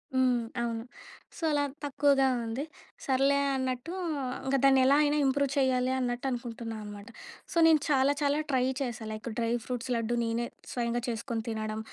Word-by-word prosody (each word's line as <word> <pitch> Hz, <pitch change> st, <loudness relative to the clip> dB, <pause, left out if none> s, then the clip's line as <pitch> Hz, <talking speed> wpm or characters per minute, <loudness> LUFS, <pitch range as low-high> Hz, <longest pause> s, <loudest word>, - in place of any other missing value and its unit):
హ్మ్, 255 Hz, -2 st, +3 dB, 0.2 s
అవును. 230 Hz, -1 st, -2 dB, 0.5 s
సో, -, -, -11 dB
అలా 290 Hz, -1 st, +2 dB, 0.2 s
తక్కువగా 280 Hz, -1 st, +3 dB, 0.2 s
ఉంది 230 Hz, +5 st, -3 dB, 0.4 s
సర్లే 275 Hz, +1 st, +3 dB, 0.2 s
అన్నట్టు 260 Hz, +3 st, -3 dB, 0.5 s
ఇంకా 270 Hz, +1 st, +2 dB
దాన్ని 270 Hz, -1 st, +6 dB
ఎలా 275 Hz, +2 st, +5 dB
అయినా 295 Hz, 0 st, +2 dB
ఇంప్రూవ్ 275 Hz, 0 st, +1 dB
చేయాలి 255 Hz, -1 st, +2 dB
అన్నట్టు 245 Hz, 0 st, -2 dB
అనుకుంటున్నా 235 Hz, -2 st, -5 dB
అనమాట. 205 Hz, 0 st, -9 dB, 0.4 s
సో, -, -, -3 dB
నేను 320 Hz, -1 st, +6 dB
చాలా 275 Hz, 0 st, +4 dB
చాలా 285 Hz, +1 st, +2 dB
ట్రై 260 Hz, -2 st, +2 dB, 0.2 s
చేశాను. 230 Hz, -4 st, -4 dB
లైక్ 215 Hz, +2 st, -5 dB
డ్రై 230 Hz, -1 st, 0 dB
ఫ్రూట్స్ 250 Hz, 0 st, -4 dB
లడ్డు 230 Hz, +1 st, 0 dB
నేనే 230 Hz, +1 st, -1 dB, 0.3 s
స్వయంగా 240 Hz, -1 st, -1 dB
చేసుకొని 230 Hz, -1 st, -3 dB
తినడం, 215 Hz, -1 st, -3 dB
250 Hz, 155 wpm, -29 LUFS, 230-275 Hz, 0.5 s, దాన్ని